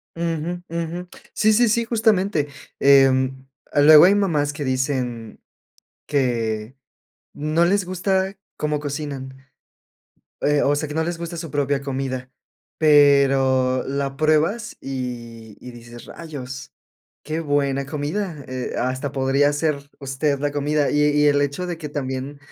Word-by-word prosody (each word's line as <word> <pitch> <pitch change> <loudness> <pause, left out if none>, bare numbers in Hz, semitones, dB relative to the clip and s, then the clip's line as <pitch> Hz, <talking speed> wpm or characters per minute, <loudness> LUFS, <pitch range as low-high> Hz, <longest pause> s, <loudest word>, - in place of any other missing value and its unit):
Uju, 170 +1 -3
uju. 170 +2 -4 0.3
Sí, 215 0 +3
sí, 235 +1 +4
sí, 230 +2 +1
justamente, 200 -9 +1 0.3
em, 135 -1 +4 0.3
luego 150 +2 +8
hay 200 +2 +5
mamás 155 -8 +1
que 145 -1 -5
dicen 130 -4 -2 0.7
que 115 -4 -1 0.6
no 155 +3 +1
les 195 +1 +1
gusta 190 +1 -1 0.2
cómo 150 -1 -1
cocinan, 140 -2 -5 1.1
eh, 145 0 +2
o 145 +1 +2
sea, 155 - -2
que 150 - -6
no 160 - +1
les 170 0 -3
gusta 170 0 -6
su 165 -2 -6
propia 140 -1 0
comida, 130 -2 -4 0.5
pero, 135 -4 +4
la 135 0 -2
pruebas, 155 +9 +1
y, 120 -4 -6
y 125 - -10
dices: 120 0 -12
"Rayos, 140 -6 -8 0.5
qué 155 +2 -3
buena 140 -2 0
comida, 150 +2 -4
eh, 130 -1 -5
hasta 130 +2 -2
podría 135 +1 +2
hacer, 145 -1 -2
usted 140 +1 -1
la 145 0 -2
comida". 145 0 0
Y 145 - +2
y 150 0 +3
el 145 0 +4
hecho, 145 +6 -2
de 175 -2 -4
que 155 -2 -7
también, 135 0 -4
145 Hz, 140 wpm, -22 LUFS, 135-160 Hz, 1.1 s, luego